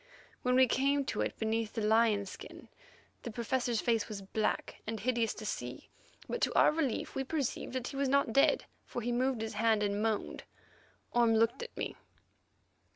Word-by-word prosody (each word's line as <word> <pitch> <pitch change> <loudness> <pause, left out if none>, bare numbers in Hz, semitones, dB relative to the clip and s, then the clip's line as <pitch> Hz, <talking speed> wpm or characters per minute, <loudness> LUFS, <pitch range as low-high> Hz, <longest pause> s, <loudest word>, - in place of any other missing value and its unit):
When 250 0 +2
we 260 0 +7
came 275 +3 +2
to - - -2
it - - -2
beneath 220 0 -1
the 225 - -2
lion 215 -1 +3
skin, 190 - -10 0.5
the - - -5
Professor's 235 0 -1
face 225 -3 +1
was 200 -2 -6
black 215 +3 -2
and 220 0 -3
hideous 230 0 0
to 215 - -8
see, 125 -10 -5 0.4
but, 485 - -3
to - - +1
our - - +6
relief, 300 -6 -1
we 270 - -1
perceived 275 -3 -2
that 255 -1 -3
he - - -8
was 275 -1 +1
not 275 -4 +2
dead, 275 - +4 0.2
for 240 - -5
he 240 - -1
moved 250 -1 +1
his 225 0 -3
hand 220 0 +2
and 205 0 0
moaned. 220 -1 -1 0.7
Orme 235 -2 +4
looked 230 - +2
at 480 - -8
me. - - -3
230 Hz, 185 wpm, -32 LUFS, 220-260 Hz, 0.7 s, we